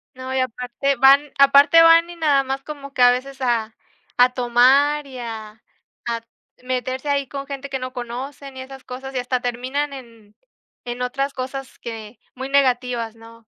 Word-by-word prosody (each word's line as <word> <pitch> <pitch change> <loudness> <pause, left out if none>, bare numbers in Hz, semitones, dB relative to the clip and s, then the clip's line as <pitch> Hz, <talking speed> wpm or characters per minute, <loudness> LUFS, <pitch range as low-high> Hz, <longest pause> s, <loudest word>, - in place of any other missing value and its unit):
No, 260 0 -6
y 265 - 0
aparte 255 +2 -1
van 275 +3 +5
aparte 280 +4 +7
van 330 +1 +6
y 345 - -9
nada 295 -5 +2
más 270 +1 -4
como 280 -2 -9
que, - - -2
a 245 0 +8
veces, 265 +2 -4
a 230 -3 -1 0.4
a 250 0 +5
tomar, 265 +4 +3
y 260 -2 -10
a 220 -2 -8 0.4
a 230 -1 -2 0.4
meterse 255 +2 -3
ahí 280 -1 0
con 275 +1 -6
gente 280 0 -7
que 270 - -2
no 255 0 -6
conocen, 260 +3 -7
y 260 - -6
esas 265 0 -11
cosas, 265 +1 -8
y - - 0
hasta 250 0 -2
terminan 260 +4 -3
en 230 -5 -13 0.5
en 240 +1 -5
otras 275 +3 -2
cosas 265 +1 -6
que 225 -1 -8 0.2
muy 260 +1 -6
negativas, 250 -4 +1
¿no?, 230 0 -16
260 Hz, 175 wpm, -21 LUFS, 245-275 Hz, 0.5 s, a